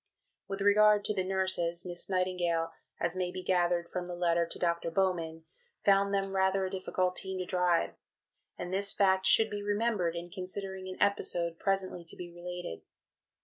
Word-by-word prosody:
With 195 Hz, 0 st, -4 dB
regard 210 Hz, +1 st, +5 dB
to -, -, 0 dB
the 190 Hz, -2 st, 0 dB
nurses, 185 Hz, -2 st, 0 dB
Miss 175 Hz, +1 st, -3 dB
Nightingale, 180 Hz, -3 st, 0 dB, 0.3 s
as 170 Hz, +1 st, 0 dB
may 180 Hz, -1 st, -1 dB
be 185 Hz, +1 st, -6 dB
gathered 175 Hz, -2 st, +1 dB
from 180 Hz, 0 st, -4 dB
the 175 Hz, -, -5 dB
letter 170 Hz, -1 st, +2 dB
to -, -, -4 dB
Dr. 170 Hz, -1 st, 0 dB
Bowman, 165 Hz, -3 st, -1 dB, 0.4 s
found 200 Hz, 0 st, +4 dB
them 195 Hz, -1 st, -1 dB
rather 190 Hz, 0 st, +2 dB
a 185 Hz, -, -4 dB
difficult 185 Hz, -1 st, -1 dB
team 190 Hz, 0 st, -3 dB
to 185 Hz, -, -3 dB
drive, 180 Hz, -2 st, +1 dB, 0.6 s
and 180 Hz, -, -5 dB
this 200 Hz, +1 st, +3 dB
fact 190 Hz, -1 st, +3 dB
should 220 Hz, -1 st, +5 dB
be 205 Hz, 0 st, -3 dB
remembered 205 Hz, -4 st, 0 dB
in 170 Hz, +1 st, -6 dB
considering 190 Hz, 0 st, -6 dB
an 185 Hz, -, -6 dB
episode 175 Hz, -4 st, +1 dB
presently 190 Hz, -3 st, -1 dB
to -, -, -7 dB
be 175 Hz, -1 st, -8 dB
related 175 Hz, -, -6 dB
(II.). -, -, -35 dB
185 Hz, 180 wpm, -31 LUFS, 175-195 Hz, 0.6 s, regard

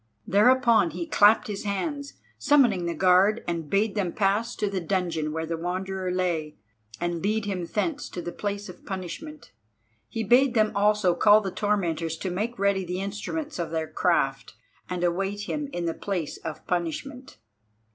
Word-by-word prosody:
Thereupon 235 Hz, -2 st, +4 dB
he 170 Hz, +2 st, -5 dB
clapped 210 Hz, +7 st, +5 dB
his 205 Hz, -4 st, -5 dB
hands, 280 Hz, -, -3 dB, 0.3 s
summoning 240 Hz, -, +3 dB
the 170 Hz, -, -2 dB
guard, 190 Hz, +5 st, +4 dB
and 165 Hz, -3 st, -3 dB
bade 200 Hz, +1 st, +1 dB
them 190 Hz, -5 st, -1 dB
pass 210 Hz, +4 st, +1 dB
to 210 Hz, -, -1 dB
the 195 Hz, -2 st, -2 dB
dungeon 170 Hz, -4 st, -1 dB
where 160 Hz, +1 st, -3 dB
the 165 Hz, +1 st, -3 dB
Wanderer 185 Hz, +2 st, -3 dB
lay, 175 Hz, -4 st, -1 dB, 0.4 s
and 175 Hz, -1 st, -2 dB
lead 215 Hz, +2 st, 0 dB
him 185 Hz, -4 st, -3 dB
thence 285 Hz, -, -2 dB
to -, -, -6 dB
the 175 Hz, 0 st, -5 dB
place 205 Hz, +2 st, -4 dB
of 180 Hz, -, -12 dB
punishment. 195 Hz, -, -7 dB, 0.6 s
He 225 Hz, -, -3 dB
bade 245 Hz, +4 st, +4 dB
them 215 Hz, -1 st, +3 dB
also 205 Hz, -2 st, +3 dB
call 210 Hz, +4 st, +6 dB
the 195 Hz, -2 st, -4 dB
tormentors 170 Hz, -6 st, -1 dB
to 185 Hz, +2 st, -3 dB
make 220 Hz, +7 st, -3 dB
ready 200 Hz, -1 st, +1 dB
the 180 Hz, +1 st, -4 dB
instruments 210 Hz, -, -4 dB
of 170 Hz, -, -2 dB
their 160 Hz, -1 st, -2 dB
craft, -, -, 0 dB, 0.3 s
and 180 Hz, -1 st, -3 dB
await 195 Hz, +4 st, -1 dB
him 290 Hz, +7 st, -3 dB
in 175 Hz, -8 st, -3 dB
the 165 Hz, -, 0 dB
place 180 Hz, -6 st, -3 dB
of 160 Hz, -2 st, -7 dB
punishment. 185 Hz, -, -4 dB
195 Hz, 170 wpm, -26 LUFS, 175-215 Hz, 0.6 s, call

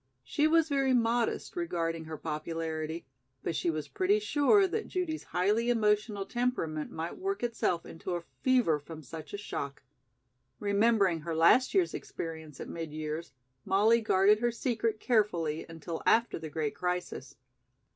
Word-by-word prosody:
She 290 Hz, -, +2 dB
was 325 Hz, 0 st, +4 dB
very 275 Hz, -3 st, +2 dB
modest 235 Hz, +5 st, 0 dB
regarding 165 Hz, -, -2 dB
her 155 Hz, 0 st, -6 dB
popularity, 160 Hz, +1 st, -4 dB, 0.4 s
but 165 Hz, -, -2 dB
she 170 Hz, -, 0 dB
was 155 Hz, -2 st, -2 dB
pretty 385 Hz, +3 st, +2 dB
sure 395 Hz, +1 st, +4 dB
that 440 Hz, +4 st, -3 dB
Judy's 350 Hz, -4 st, -3 dB
highly 210 Hz, +6 st, +1 dB
emotional 210 Hz, -3 st, +1 dB
temperament 215 Hz, -12 st, -2 dB
might 165 Hz, -, -5 dB
work 390 Hz, -5 st, -2 dB
itself 230 Hz, -7 st, 0 dB
into 175 Hz, +2 st, -5 dB
a 170 Hz, -, -4 dB, 0.2 s
fever 245 Hz, -, +3 dB
from 155 Hz, +2 st, -10 dB
such 155 Hz, +2 st, -9 dB
a -, -, -4 dB
shock. 140 Hz, -9 st, -5 dB, 0.8 s
Remembering 200 Hz, -3 st, +3 dB
her 165 Hz, +1 st, -4 dB
last 170 Hz, -, +5 dB
year's 370 Hz, -3 st, +3 dB
experience 160 Hz, -3 st, -6 dB
at -, -, -6 dB
mid 165 Hz, -2 st, -5 dB
years, 155 Hz, +1 st, -4 dB, 0.3 s
Molly 215 Hz, +4 st, +4 dB
guarded 210 Hz, 0 st, +4 dB
her 240 Hz, +1 st, +2 dB
secret 230 Hz, -2 st, -1 dB
carefully 175 Hz, -, +1 dB
until 165 Hz, 0 st, -6 dB
after 230 Hz, -4 st, +3 dB
the 160 Hz, -1 st, -6 dB
great 150 Hz, -1 st, -2 dB
crisis. 180 Hz, -7 st, -3 dB
195 Hz, 150 wpm, -30 LUFS, 160-240 Hz, 0.8 s, last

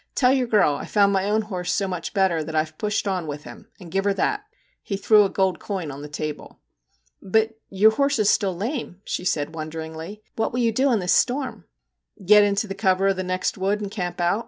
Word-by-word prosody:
Tell 255 Hz, -1 st, +4 dB
your 260 Hz, -2 st, +1 dB
girl 210 Hz, -10 st, +4 dB
I -, -, -5 dB
Ve -, -, -13 dB
found 200 Hz, -1 st, +3 dB
my 195 Hz, +1 st, +1 dB
own 215 Hz, +1 st, +2 dB
horse 180 Hz, -4 st, -3 dB
so 195 Hz, 0 st, 0 dB
much 180 Hz, -2 st, -4 dB
better 185 Hz, -5 st, +2 dB
that 160 Hz, +1 st, -6 dB
I -, -, +4 dB
have 155 Hz, 0 st, -15 dB
pushed 210 Hz, 0 st, -1 dB
on 185 Hz, -4 st, -1 dB
with 150 Hz, 0 st, -6 dB
him, 215 Hz, -, -12 dB
and 175 Hz, -4 st, -11 dB
give 195 Hz, 0 st, 0 dB
her 200 Hz, -1 st, +2 dB
that/ 415 Hz, -, -1 dB, 0.4 s
He 195 Hz, -, -4 dB
threw 210 Hz, +1 st, +5 dB
a -, -, -1 dB
gold 190 Hz, -4 st, 0 dB
coin 185 Hz, -7 st, -4 dB
on 140 Hz, +1 st, -8 dB
the 150 Hz, -, -7 dB
table. 150 Hz, 0 st, -6 dB, 0.3 s
' -, -, -40 dB, 0.2 s
But 220 Hz, +3 st, +1 dB
your 205 Hz, +3 st, +5 dB
horse 280 Hz, +5 st, +1 dB
is 215 Hz, -2 st, +2 dB
still 190 Hz, -3 st, +2 dB
lame/ 225 Hz, -, -4 dB
she -, -, -3 dB
said 155 Hz, -3 st, -1 dB
won 155 Hz, -1 st, -5 dB
deringly. 160 Hz, +5 st, -7 dB
' -, -, -44 dB
What 220 Hz, -, -1 dB
will 250 Hz, -, -1 dB
you 230 Hz, -1 st, +2 dB
do 265 Hz, +5 st, +2 dB
in 235 Hz, -, +3 dB
this 180 Hz, -3 st, +1 dB
storm? 245 Hz, -, 0 dB, 0.2 s
' -, -, -57 dB
* 190 Hz, -, -17 dB
Get 210 Hz, +2 st, +7 dB
into 200 Hz, +1 st, +1 dB
the 195 Hz, -, -5 dB
cover 195 Hz, -1 st, +2 dB
of 195 Hz, -, +1 dB
the 185 Hz, -, -3 dB
next 185 Hz, +1 st, -2 dB
wood 200 Hz, +2 st, 0 dB
and 205 Hz, -2 st, -5 dB
camp 180 Hz, -4 st, -4 dB
out. 175 Hz, +4 st, +2 dB
195 Hz, 260 wpm, -23 LUFS, 175-215 Hz, 0.4 s, Get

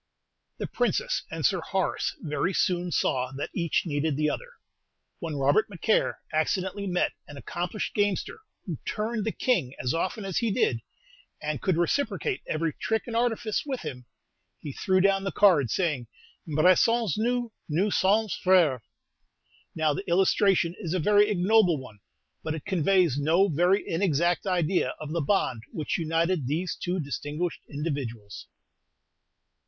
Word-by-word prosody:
The -, -, -3 dB
Princess -, -, 0 dB
and -, -, -3 dB
Sir -, -, +3 dB
Horace -, -, -1 dB
very 170 Hz, +3 st, -1 dB
soon 180 Hz, -1 st, +1 dB
saw 130 Hz, -4 st, 0 dB
that 145 Hz, -, -4 dB
each 170 Hz, -2 st, 0 dB
needed 145 Hz, -2 st, -1 dB
the 150 Hz, 0 st, +1 dB
other. -, -, -6 dB, 0.7 s
When 165 Hz, -5 st, -4 dB
Robert 140 Hz, +10 st, +2 dB
Macaire 205 Hz, +3 st, +1 dB, 0.2 s
accidentally 190 Hz, +5 st, -1 dB
met 180 Hz, -1 st, +1 dB, 0.2 s
an 145 Hz, -, -10 dB
accomplished 175 Hz, +7 st, -4 dB
gamester 205 Hz, -, -1 dB, 0.3 s
who -, -, -5 dB
"turned 215 Hz, 0 st, -2 dB
the -, -, +1 dB
king" 175 Hz, -, 0 dB
as 125 Hz, -, -1 dB
often 190 Hz, +5 st, -2 dB
as 190 Hz, -3 st, -1 dB
he 235 Hz, -, 0 dB
did, 125 Hz, -, +1 dB, 0.6 s
and 150 Hz, -3 st, -3 dB
could 185 Hz, -4 st, +1 dB
reciprocate 195 Hz, -, 0 dB
every 155 Hz, 0 st, -1 dB
trick 220 Hz, 0 st, -1 dB
and 230 Hz, -, -5 dB
artifice 230 Hz, -2 st, 0 dB
with 270 Hz, -4 st, -4 dB
him, 125 Hz, -6 st, -7 dB, 0.5 s
he 145 Hz, -, -7 dB
threw 185 Hz, +3 st, +1 dB
down 195 Hz, 0 st, +3 dB
the 195 Hz, -, -2 dB
cards, 150 Hz, -, +4 dB
saying, 150 Hz, -10 st, -1 dB, 0.4 s
"Embrassons 185 Hz, +6 st, +3 dB
nous, 240 Hz, +1 st, 0 dB, 0.2 s
nous 185 Hz, +7 st, +1 dB
sommes 210 Hz, +2 st, +2 dB
frères!" 170 Hz, -9 st, +4 dB, 0.9 s
Now, 155 Hz, -2 st, +2 dB
the 195 Hz, -, -5 dB
illustration 185 Hz, -1 st, +3 dB
is 180 Hz, -4 st, -3 dB
a -, -, +1 dB
very 205 Hz, +4 st, +4 dB
ignoble 190 Hz, -3 st, +3 dB
one, 125 Hz, -6 st, -11 dB, 0.4 s
but 160 Hz, 0 st, -3 dB
it 155 Hz, -, -8 dB
conveys 180 Hz, -5 st, +2 dB
no 170 Hz, +7 st, +3 dB
very 180 Hz, +5 st, +2 dB
inexact 170 Hz, +1 st, +1 dB
idea 175 Hz, -6 st, +1 dB
of 155 Hz, -1 st, -6 dB
the 170 Hz, 0 st, 0 dB
bond 140 Hz, -, 0 dB
which 160 Hz, +5 st, -2 dB
united 165 Hz, -2 st, 0 dB
these 165 Hz, +6 st, -1 dB
two 180 Hz, +1 st, -2 dB
distinguished 150 Hz, +3 st, -3 dB
individuals. 135 Hz, -, -5 dB
175 Hz, 150 wpm, -27 LUFS, 150-200 Hz, 0.9 s, cards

